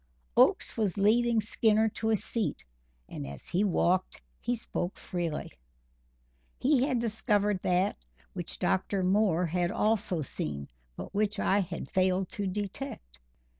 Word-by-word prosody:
Oakes -, -, +4 dB
was 210 Hz, -4 st, 0 dB
leading 230 Hz, +3 st, +3 dB
Skinner 220 Hz, +1 st, +3 dB
to 220 Hz, +1 st, -2 dB
a 220 Hz, -, +4 dB
seat, 220 Hz, +1 st, -2 dB, 0.4 s
and 70 Hz, -, -6 dB
as 70 Hz, -2 st, -9 dB
he 185 Hz, +4 st, 0 dB
walked, 185 Hz, -1 st, +1 dB, 0.2 s
he 245 Hz, +1 st, -1 dB
spoke 195 Hz, -5 st, -4 dB
freely. 170 Hz, -4 st, -3 dB, 1.1 s
He 265 Hz, -1 st, +3 dB
had 260 Hz, -4 st, +1 dB
discovered 210 Hz, -3 st, +1 dB
that 180 Hz, +2 st, +1 dB, 0.4 s
which -, -, -5 dB
Dr. 95 Hz, -, 0 dB
Moore 185 Hz, -2 st, +3 dB
had 175 Hz, +1 st, 0 dB
also 210 Hz, -7 st, +1 dB
seen, 70 Hz, -, -4 dB, 0.3 s
but -, -, -8 dB
which 210 Hz, +1 st, +1 dB
I 200 Hz, 0 st, +2 dB
had 185 Hz, -, -4 dB
failed 185 Hz, 0 st, +1 dB
to 205 Hz, -4 st, -3 dB
detect. 195 Hz, -, -5 dB
200 Hz, 135 wpm, -30 LUFS, 180-220 Hz, 1.1 s, Oakes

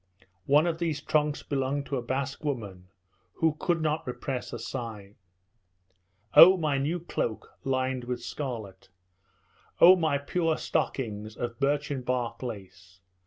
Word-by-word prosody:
One 145 Hz, +3 st, +5 dB
of 165 Hz, -1 st, -1 dB
these 165 Hz, -4 st, -1 dB
trunks 150 Hz, 0 st, 0 dB
belonged 140 Hz, 0 st, -1 dB
to 140 Hz, -, -3 dB
the 125 Hz, -, -1 dB
Basque 135 Hz, +4 st, -3 dB
woman, 100 Hz, -11 st, -4 dB, 0.5 s
who 160 Hz, -2 st, +1 dB
could 170 Hz, -3 st, 0 dB
not 155 Hz, -2 st, -1 dB
repress 125 Hz, +1 st, -4 dB
a -, -, -4 dB
sigh. 110 Hz, -4 st, -6 dB, 1.2 s
"Oh, 185 Hz, +3 st, +10 dB
my 150 Hz, -5 st, 0 dB
new 155 Hz, +6 st, -1 dB
cloak 120 Hz, -9 st, -4 dB
lined 130 Hz, -1 st, -1 dB
with 125 Hz, 0 st, -4 dB
scarlet! 110 Hz, -11 st, -6 dB, 0.9 s
Oh, 180 Hz, +2 st, +9 dB
my 160 Hz, -5 st, +1 dB
poor 160 Hz, +3 st, 0 dB
stockings 110 Hz, -4 st, -2 dB
of 120 Hz, 0 st, -4 dB
birchen 145 Hz, -1 st, 0 dB
bark 120 Hz, -2 st, -2 dB
lace! 95 Hz, -6 st, -9 dB
135 Hz, 135 wpm, -28 LUFS, 120-150 Hz, 1.2 s, Oh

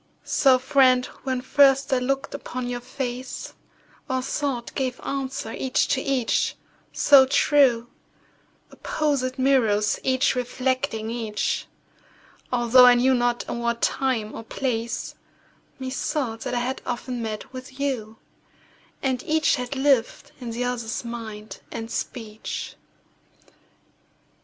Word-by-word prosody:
So, 265 Hz, -2 st, +4 dB
friend, 255 Hz, -1 st, +4 dB, 0.2 s
when 260 Hz, -1 st, -1 dB
first 275 Hz, +1 st, +4 dB
I 260 Hz, -, +3 dB
look'd 270 Hz, +2 st, -2 dB
upon 255 Hz, -3 st, -5 dB
your 245 Hz, 0 st, -3 dB
face, 250 Hz, 0 st, -5 dB, 0.6 s
Our 260 Hz, -1 st, 0 dB
thought 270 Hz, -3 st, -2 dB
gave 260 Hz, -2 st, -2 dB
answer 270 Hz, -4 st, -4 dB
each 260 Hz, -1 st, +1 dB
to 265 Hz, -, +1 dB
each, 265 Hz, -4 st, 0 dB, 0.4 s
so 270 Hz, -2 st, +6 dB
true— 260 Hz, -4 st, +4 dB, 0.8 s
Opposed 280 Hz, -4 st, -1 dB
mirrors 225 Hz, -6 st, +2 dB
each 260 Hz, 0 st, +2 dB
reflecting 250 Hz, -2 st, -1 dB
each— 225 Hz, -3 st, -2 dB, 0.8 s
Altho' 245 Hz, +1 st, +6 dB
I 245 Hz, 0 st, +8 dB
knew 255 Hz, +2 st, +4 dB
not 240 Hz, -1 st, 0 dB
in 235 Hz, -, -3 dB
what 235 Hz, 0 st, -1 dB
time 245 Hz, -6 st, 0 dB
or -, -, -7 dB
place, 235 Hz, -1 st, -3 dB, 0.6 s
Methought 260 Hz, -2 st, -3 dB
that -, -, -2 dB
I 240 Hz, -, +1 dB
had 260 Hz, +2 st, -3 dB
often 245 Hz, 0 st, -4 dB
met 220 Hz, +2 st, -5 dB
with 260 Hz, +1 st, -9 dB
you, 235 Hz, -6 st, -2 dB, 0.9 s
And 260 Hz, -2 st, 0 dB
each 315 Hz, -1 st, +2 dB
had 250 Hz, +2 st, -4 dB
lived 270 Hz, -4 st, +1 dB
in 240 Hz, -, -5 dB
the 235 Hz, +2 st, -3 dB
other's 245 Hz, -1 st, -3 dB
mind 220 Hz, -2 st, -7 dB
and 225 Hz, 0 st, -6 dB
speech. 220 Hz, -3 st, -5 dB
255 Hz, 125 wpm, -24 LUFS, 235-265 Hz, 0.9 s, I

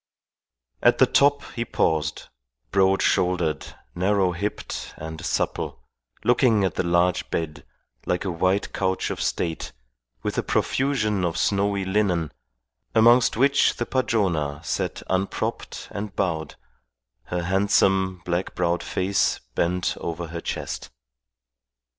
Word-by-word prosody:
At -, -, +5 dB
the -, -, +6 dB
top 140 Hz, 0 st, +3 dB
he 115 Hz, -, -2 dB
paused, 80 Hz, -9 st, -1 dB, 0.4 s
broad 95 Hz, 0 st, +3 dB
shouldered, 90 Hz, -3 st, 0 dB, 0.2 s
narrow 95 Hz, +1 st, +2 dB
hipped 100 Hz, +4 st, -4 dB
and 80 Hz, +1 st, -7 dB
supple, -, -, -2 dB, 0.4 s
looking 120 Hz, -4 st, +4 dB
at 95 Hz, -4 st, +1 dB
the -, -, 0 dB
large 85 Hz, 0 st, +1 dB
bed, 80 Hz, -2 st, -3 dB, 0.4 s
like 90 Hz, +2 st, 0 dB
a 95 Hz, -, -1 dB
white 95 Hz, +4 st, 0 dB
couch 95 Hz, -1 st, -1 dB
of -, -, -4 dB
state, 80 Hz, -2 st, -2 dB, 0.5 s
with -, -, -1 dB
a -, -, +2 dB
profusion 110 Hz, -8 st, 0 dB
of 85 Hz, -2 st, -1 dB
snowy 100 Hz, -1 st, +1 dB
linen, 95 Hz, -5 st, +1 dB, 0.6 s
amongst 115 Hz, +1 st, +5 dB
which 140 Hz, +3 st, +4 dB
the 120 Hz, -, -2 dB
Padrona 90 Hz, -, 0 dB
sat -, -, -2 dB
unpropped 95 Hz, +1 st, -2 dB
and 100 Hz, -1 st, -5 dB
bowed, 80 Hz, -6 st, -1 dB, 0.7 s
her 90 Hz, -1 st, -3 dB
handsome, 95 Hz, -1 st, +2 dB
black 90 Hz, +1 st, -2 dB
browed 85 Hz, -1 st, +1 dB
face 100 Hz, +2 st, 0 dB
bent 90 Hz, +4 st, 0 dB
over 85 Hz, 0 st, -4 dB
her 85 Hz, 0 st, -5 dB
chest. -, -, -4 dB
95 Hz, 125 wpm, -24 LUFS, 85-100 Hz, 0.7 s, the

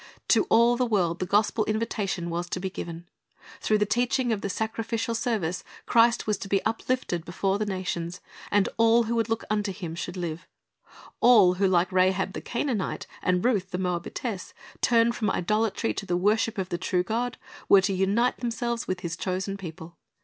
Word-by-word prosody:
To -, -, +4 dB
all 235 Hz, +1 st, +4 dB
the 255 Hz, -, +2 dB
world 180 Hz, -6 st, +1 dB
the 185 Hz, -, -2 dB
gospel 215 Hz, +2 st, +2 dB
invitation 205 Hz, -5 st, -2 dB
was 175 Hz, +1 st, -3 dB
to 185 Hz, -, -2 dB
be 190 Hz, 0 st, -4 dB
given. 170 Hz, -2 st, -7 dB, 0.5 s
Through 215 Hz, -, +2 dB
the 210 Hz, -, +2 dB
teaching 245 Hz, +2 st, +1 dB
of 205 Hz, -, -3 dB
the 200 Hz, -, -3 dB
sacrificial 225 Hz, +2 st, -2 dB
service, 220 Hz, -7 st, -1 dB, 0.2 s
Christ 235 Hz, 0 st, +4 dB
was 210 Hz, -2 st, 0 dB
to -, -, -6 dB
be 195 Hz, -1 st, +1 dB
uplifted 225 Hz, -6 st, -1 dB
before 195 Hz, +3 st, -1 dB
the 215 Hz, -, -1 dB
nations, 180 Hz, -2 st, -3 dB, 0.3 s
and 200 Hz, -1 st, +3 dB
all 230 Hz, +1 st, +5 dB
who 230 Hz, +1 st, -2 dB
would 230 Hz, -1 st, 0 dB
look 225 Hz, 0 st, -1 dB
unto 210 Hz, -1 st, 0 dB
Him 180 Hz, -4 st, -6 dB
should 180 Hz, +2 st, -5 dB
live. 170 Hz, 0 st, -5 dB, 0.7 s
All 215 Hz, -7 st, +6 dB
who, 195 Hz, +2 st, +2 dB
like 180 Hz, 0 st, +2 dB
Rahab 185 Hz, +1 st, +2 dB
the -, -, -5 dB
Canaanite, 235 Hz, -5 st, -2 dB, 0.2 s
and 180 Hz, +2 st, +1 dB
Ruth 205 Hz, -7 st, +1 dB
the 180 Hz, -, -3 dB
Moabitess, 180 Hz, +3 st, -3 dB, 0.3 s
turned 235 Hz, 0 st, +4 dB
from 215 Hz, -4 st, 0 dB
idolatry 215 Hz, +5 st, 0 dB
to 200 Hz, -, -6 dB
the 175 Hz, -1 st, +1 dB
worship 210 Hz, +4 st, +1 dB
of 190 Hz, -1 st, -2 dB
the 175 Hz, -, -3 dB
true 180 Hz, 0 st, 0 dB
God, 235 Hz, +5 st, -2 dB, 0.3 s
were 195 Hz, -, +8 dB
to 195 Hz, +1 st, 0 dB
unite 200 Hz, +6 st, +1 dB
themselves 235 Hz, -1 st, -2 dB
with 185 Hz, 0 st, -2 dB
His 170 Hz, -2 st, -3 dB
chosen 190 Hz, +3 st, -3 dB
people. 170 Hz, -3 st, -9 dB
200 Hz, 185 wpm, -26 LUFS, 180-225 Hz, 0.7 s, were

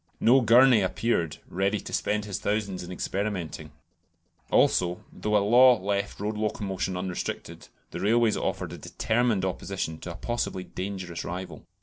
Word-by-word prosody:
No 130 Hz, +3 st, +5 dB
Gurney 120 Hz, 0 st, +6 dB
appeared, 95 Hz, -5 st, 0 dB
ready 100 Hz, +3 st, 0 dB
to -, -, -9 dB
spend 105 Hz, 0 st, 0 dB
his 100 Hz, -3 st, -4 dB
thousands 100 Hz, -3 st, -1 dB
in 90 Hz, 0 st, -8 dB
experimenting; 95 Hz, -3 st, -3 dB, 0.8 s
also, 90 Hz, 0 st, +2 dB
though -, -, -4 dB
the 105 Hz, -, +5 dB
law 120 Hz, +4 st, +6 dB
left 100 Hz, +1 st, -2 dB
road 105 Hz, +1 st, -2 dB
locomotion 95 Hz, -4 st, -2 dB
unrestricted, 90 Hz, -1 st, -5 dB, 0.2 s
the -, -, -5 dB
railways 115 Hz, +1 st, +3 dB
offered -, -, -3 dB
a -, -, -8 dB
determined 110 Hz, -4 st, 0 dB
opposition 90 Hz, -3 st, -3 dB
to 90 Hz, -, -6 dB
a -, -, -13 dB
possibly 120 Hz, -5 st, -3 dB
dangerous 95 Hz, -3 st, -5 dB
rival. 90 Hz, +1 st, -7 dB
100 Hz, 145 wpm, -27 LUFS, 90-110 Hz, 0.8 s, Gurney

